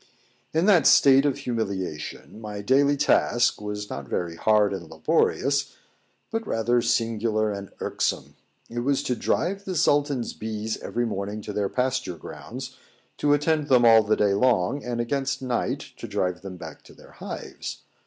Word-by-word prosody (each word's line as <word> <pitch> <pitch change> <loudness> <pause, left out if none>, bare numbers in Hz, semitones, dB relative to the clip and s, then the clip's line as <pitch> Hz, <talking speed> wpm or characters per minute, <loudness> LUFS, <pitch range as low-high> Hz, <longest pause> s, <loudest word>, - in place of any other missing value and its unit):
] - - -38
In 160 +3 +1
that 180 -8 +5
state 135 +1 +6
of 140 - 0
humiliation 105 - -4
my 105 -2 -6
daily 140 +5 +3
task 120 -5 +2
was 105 0 -4
not 70 -8 -7
very 85 -2 -2
hard 105 +2 +3
and 95 -3 -6
laborious, 140 +1 +1 0.6
but 225 -1 -3
rather 120 +2 +1
singular 110 -2 0
and 100 -1 -6
irksome. - - -2 0.3
It 120 - -5
was 140 +3 0
to 130 -3 -1
drive 195 +10 -1
the 190 -2 -4
Sultan's 145 -5 +1
bees 110 0 -4
every 120 0 -2
morning 105 -1 -3
to 105 - -6
their 100 -1 -1
pasture 130 -8 -1
grounds, 130 - -8 0.4
to 145 0 +3
attend 150 0 0
them 125 -3 +5
all 115 -1 +8
the 110 0 +1
day 100 -1 +3
long, 120 +3 +2
and 120 -1 -3
against 135 +3 -1
night 125 -2 -1
to - - -7
drive 90 -1 -1
them 95 -2 -8
back - - -10
to - - -16
their - - -17
hives. - - -7
120 Hz, 165 wpm, -25 LUFS, 105-140 Hz, 0.6 s, all